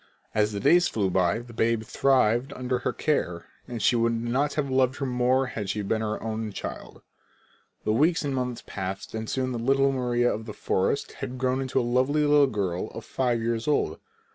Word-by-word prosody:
As 105 0 +2
the 100 - -3
days 175 - +5
flew 100 -4 0
by 90 -2 +2
and 120 - -5
the 120 - -11
babe 115 0 +1
thrived 125 0 +2
under 125 0 -2
her - - -1
care, 90 - -1 0.3
she 115 +3 +3
could 115 0 +2
not 130 +5 0
have 150 -2 0
loved 130 -1 +2
her 140 - -3
more 125 +1 +2
had 105 -6 -5
she 105 +1 -2
been 110 +2 0
her 110 -1 -2
own 110 -1 -3
child. - - -7 0.8
The 110 - +1
weeks 155 +6 +2
and 140 - -1
months 125 -2 -3
passed 95 0 -5
and 110 0 -4
soon 130 -1 -1
the 120 - -3
little 135 +3 +3
Maria 120 -2 +1
of 110 +2 -6
the 105 - -6
forest 95 +9 0
had 130 -1 -6
grown 130 +1 0
into 130 0 0
a - - +1
lovely 130 +5 +2
little 145 -1 +5
girl 100 -4 -2
five 120 +1 -1
years 115 +1 -1
old. 150 - +1
120 Hz, 200 wpm, -26 LUFS, 110-130 Hz, 0.8 s, days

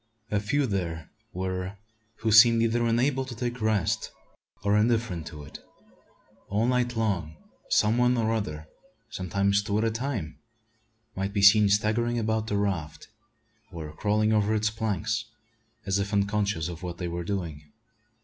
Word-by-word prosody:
A 105 - +2
few 135 +8 0
there 85 - -3 0.2
were 95 +1 -4 0.4
who 110 - +1
seemed 115 +1 +7
either 115 +1 +1
unable 130 +4 +1
to 130 -2 -8
take 120 +1 -4
rest 110 -5 0 0.5
or 100 0 +2
indifferent 110 -7 +1
to 75 -2 -9
it. 70 - -11 0.9
All 105 +3 +1
night 125 -1 +1
long 90 -8 -1 0.3
some 110 +3 +3
one 125 0 +3
or 115 -1 +1
other 75 -8 -4 0.4
sometimes 100 +1 +1
two 100 0 -1
at 110 - +1
a 115 - +1
time 110 - -4 0.8
might 95 +1 -3
be 100 -2 0
seen 105 0 +7
staggering 110 +4 +1
about 110 -1 -1
the 105 - 0
raft, 95 -7 -3 0.6
or 80 -4 -7
crawling 105 +4 +1
over 105 0 +2
its 105 0 +1
planks, 110 +1 -2 0.6
as 95 0 +1
if 100 +1 -2
unconscious 100 -4 0
of 85 -1 -7
what 90 -2 -5
they 90 - -3
were 85 0 -4
doing. 85 -6 -5
105 Hz, 155 wpm, -27 LUFS, 95-115 Hz, 0.9 s, seemed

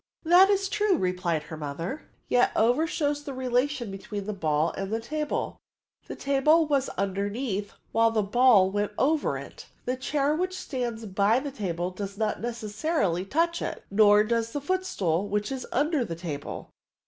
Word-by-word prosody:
" - - -48
That 380 +2 +8
is 395 -1 +2
true/* 415 0 +2
replied 180 -4 -1
her 160 - -8
mother, 160 - -5
" - - -41
yet 245 0 +3
i^f^er 245 +9 +3
shows 290 -3 -1
the 275 -2 -6
relation 255 -2 0
between 195 +1 -6
the 210 - -3
ball 155 -3 +1
and 195 +1 -5
the 225 - 0
table: 300 +6 -3 0.5
the - - -6
table 290 +4 +3
was 280 -3 +1
underneath 200 +2 -2 0.2
while 230 0 +4
the 220 -2 +1
ball 205 -3 +5
went 205 +1 -1
over 300 +3 +1
it. - - -10 0.2
The 250 - 0
chair 280 +2 0
which 370 +3 -2
stands 240 -7 -4
by 200 +4 +2
the 285 +1 -5
table 180 -7 -3
does 200 +1 -6
not 215 -1 -1
necessarily 215 - -1
touch 335 - 0
it; - - -4
nor 210 0 +6
does 230 +1 -1
the 290 - -1
footstool, 205 - -1
which 210 +4 -1
is 265 -1 -4
under 290 +1 +1
the 170 -7 -5
table." 160 -4 -6
230 Hz, 175 wpm, -27 LUFS, 195-285 Hz, 0.5 s, That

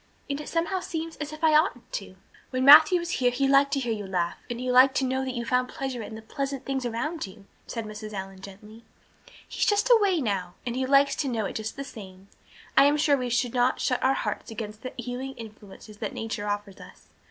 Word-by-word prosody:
And 285 +1 -3
it - - -8
somehow 340 +3 -1
seems 330 -2 -5
as 300 0 -5
if 310 +1 -10
I 315 -1 +5
oughtn't 255 -5 +1
to." 195 -2 -5 0.3
"When 255 0 -1
Matthew 310 +5 +9
was 345 0 -4
here 250 -6 +2
he 260 +3 0
liked 275 +1 +4
to 280 - +1
hear 240 -4 -1
you 205 -2 -5
laugh 175 -2 -1
and 240 0 -4
he 250 0 -1
liked 260 +2 +6
to 270 - +1
know 260 +1 -1
that 260 -1 -4
you 235 -1 -3
found 250 +1 +1
pleasure 265 -3 -4
in 220 0 -7
the 220 - -10
pleasant 275 +3 -4
things 265 -2 -2
around 300 +4 -3
you," 195 +1 -14 0.2
said 230 -2 -5
Mrs. 215 0 -8
Allan 195 -1 -7
gently. 210 +3 -12 0.6
"He - - -9
is - - +3
just 420 +4 +2
away 405 -7 +5
now; 190 -8 -2
and 240 -1 -3
he 260 0 -1
likes 275 +1 +4
to 285 - -1
know 225 -4 -1
it - - -4
just 220 0 -4
the 275 - -5
same. 195 -7 -12 0.5
I - - +7
am 290 +1 +4
sure 295 -1 +3
we 250 -2 -3
should 240 0 0
not 250 +1 +2
shut 250 - 0
our 265 +1 +3
hearts - - -4
against 215 -1 -7
the 255 - -7
healing 250 +2 -5
influences 215 -2 -12
that - - -4
nature 220 -2 -4
offers 205 -1 -4
us. - - -15
250 Hz, 240 wpm, -26 LUFS, 215-280 Hz, 0.6 s, Matthew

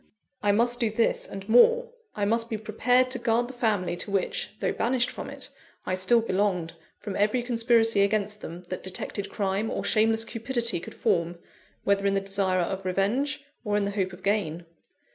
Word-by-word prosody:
I 205 - +3
must 240 +3 +2
do 230 -3 +2
this 225 +2 +1
and 195 0 -8
more, 475 - +5 0.2
I 205 - 0
must 230 +2 0
be 220 - -2
prepared 245 +4 +2
to 255 - -1
guard 240 0 +1
the 260 - -9
family 210 -8 0
to 205 - -5
which 195 -2 -1
though - - 0
banished 245 +1 +1
from - - -7
it - - -9 0.4
I - - -1
still 185 +6 +3
belonged, 185 -5 0 0.2
from 205 -2 -6
every 215 +4 +1
conspiracy 230 -3 +3
against 205 +1 0
them 170 +2 -8
that 185 - -4
detected 195 +1 -4
crime 200 +2 -1
or - - -3
shameless 225 +1 +2
cupidity 235 -3 0
could - - -10
form, 170 0 0 0.5
whether 200 0 +2
in 195 - +2
the - - +3
desire 195 -2 0
of 190 +2 -3
revenge, 225 +11 0 0.2
or 210 -2 0
in 205 - +1
the 200 - -1
hope 190 -2 -1
of 180 +1 -13
gain.. 175 -5 -1
210 Hz, 190 wpm, -27 LUFS, 195-235 Hz, 0.5 s, more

